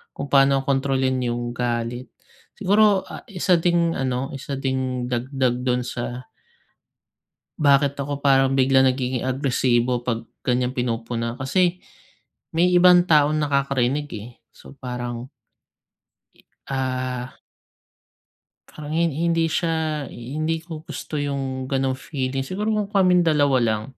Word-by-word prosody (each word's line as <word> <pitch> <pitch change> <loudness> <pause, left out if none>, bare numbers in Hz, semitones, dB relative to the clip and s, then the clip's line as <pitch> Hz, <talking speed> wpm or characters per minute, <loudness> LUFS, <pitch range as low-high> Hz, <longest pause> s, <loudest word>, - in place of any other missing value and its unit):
kung 140 - -6
paano 135 -1 +4
kontrolin 135 -1 +1
yung 120 0 -2
galit. 120 +1 -3 0.5
Siguro, 205 0 +3
ah, - - -10
isa 180 -4 +1
ding 170 0 +2
ano, 130 -1 -2
isa 135 +1 -5
ding 130 -2 -2
dagdag 125 +1 0
dun 125 0 +1
sa 125 +1 -5 1.3
bakit 140 -1 +4
ako 140 0 -4
parang 135 -1 +3
biglang 135 0 +4
nagiging 130 -1 0
agresibo 125 -2 +1
'pag 115 -1 -3 0.2
ganiyang 125 0 0
pinupuna, 115 -1 -3
kasi 175 +7 +1 0.8
may 170 +2 +4
ibang 180 0 +6
taong 150 -2 +4
nakakarinig, 140 -1 0
eh. 105 +2 -8 0.2
So, - - -15
parang 125 -1 -5 1.4
Ah. 130 -1 -3 1.3
Parang 150 -1 -9
hin 170 -1 +2
hindi 165 +2 +1
siya 160 -2 -1
hindi 155 +7 -3
ko 160 -3 -7
gusto 160 - -7
yung 135 -2 -3
gano'ng 135 -1 +1
feeling. 135 -2 -2
Siguro, 205 +8 -3
kung 210 -1 -1
kaming 185 -3 +4
dalawa 145 -5 +3
lang. 110 -2 0
135 Hz, 120 wpm, -23 LUFS, 125-155 Hz, 1.4 s, ibang